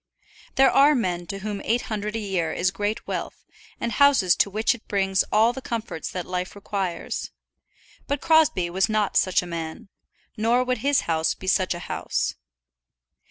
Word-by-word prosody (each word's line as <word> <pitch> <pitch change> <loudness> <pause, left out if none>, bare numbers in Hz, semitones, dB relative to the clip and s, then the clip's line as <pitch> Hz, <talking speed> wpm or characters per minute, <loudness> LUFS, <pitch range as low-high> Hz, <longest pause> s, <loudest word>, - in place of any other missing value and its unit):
There 270 0 +5
are 285 +2 +5
men 175 -7 -1
to 195 +2 -6
whom 205 -2 -3
eight 235 +2 0
hundred 210 0 -4
a - - -1
year 190 -6 -1
is 180 +2 0
great 205 +2 -3
wealth, - - -5 0.3
and 235 - -2
houses 250 -8 +4
to - - +3
which 215 +5 +1
it 240 - -13
brings 195 -1 +1
all 225 +3 +4
the 265 - -7
comforts 230 -9 -4
that 180 -2 -5
life 180 +1 -4
requires. 195 -4 -4 0.8
But 285 0 -1
Crosbie 315 - +3
was 190 +4 +1
not 215 -2 0
such 185 -1 +3
a - - -7
man, 170 +5 -6 0.5
nor 235 +3 +2
would 255 -1 -1
his 280 +3 +2
house 160 -1 0
be - - -11
such 185 -1 +1
a - - -6
house. - - -2
205 Hz, 175 wpm, -24 LUFS, 185-235 Hz, 0.8 s, There